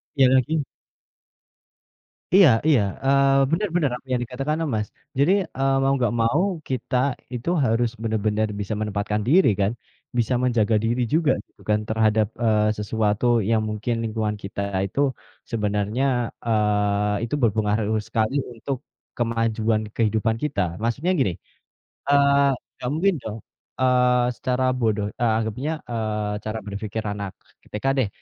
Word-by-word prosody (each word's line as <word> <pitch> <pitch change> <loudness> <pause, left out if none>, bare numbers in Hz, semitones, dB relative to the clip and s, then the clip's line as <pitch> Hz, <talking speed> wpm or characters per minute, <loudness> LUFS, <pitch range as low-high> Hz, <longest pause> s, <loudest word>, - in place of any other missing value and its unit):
Iya 135 -2 +5
lagi. 140 +4 +2 1.7
Iya 190 -7 +8 0.2
iya, 140 -9 +5 0.2
eee, 135 0 +4
bener 210 +5 +1
bener, 150 -6 +2
apa 135 - -22
yang 125 -1 +1
dikatakan 135 +5 -2
sama 155 -5 -1
Mas. 105 - -2 0.3
Jadi, 150 +7 +4 0.3
eee, 135 0 +2
mau 135 - +3
nggak 120 -1 0
mau 130 +10 +2 0.3
kita 130 0 -2 0.4
itu 125 +7 -3 0.2
harus 115 +1 +2
bener-bener 110 -1 0
bisa 100 +2 -3
menempatkan 105 0 -1
diri 180 +7 +5
kan, 100 +2 +2 0.5
bisa 120 +2 +1
menjaga 115 -3 +2
diri 120 +2 0
juga 160 -1 +3 0.2
gitu - - -25
kan 105 0 +3
terhadap, 110 -1 +2 0.2
eee, 110 -2 +3 0.2
sesuatu 105 +1 0 0.2
yang 110 -1 +3
mungkin 110 +3 -2
lingkungan 110 -1 -1
kita 100 +1 -4 0.2
itu 100 - -5 0.5
sebenarnya, 105 +2 -1 0.4
eee, 105 -1 +1
itu 120 +5 -1
berpengaruh 110 0 +1
sekali 110 +4 0 0.2
untuk 125 +4 -4 0.4
kemajuan 115 -2 0
kehidupan 110 0 +1
kita. 145 -9 0 0.2
Maksudnya 135 +11 0
gini, 95 -9 +2 0.8
eee, 140 0 +4 0.3
nggak 125 - -4
mungkin 190 +3 +2
dong, 110 +1 -5 0.4
eee, 125 -1 +3
secara 130 -1 -1
bodoh, 110 -3 0
eee, 115 -2 +3
anggapnya, 115 +7 -2 0.2
eee, 105 -2 -2
cara 110 +1 -3
berpikir 105 +2 -4
anak 100 -2 -5 0.4
TK 105 +4 -5
deh. 115 -6 +2
115 Hz, 140 wpm, -23 LUFS, 105-130 Hz, 1.7 s, Iya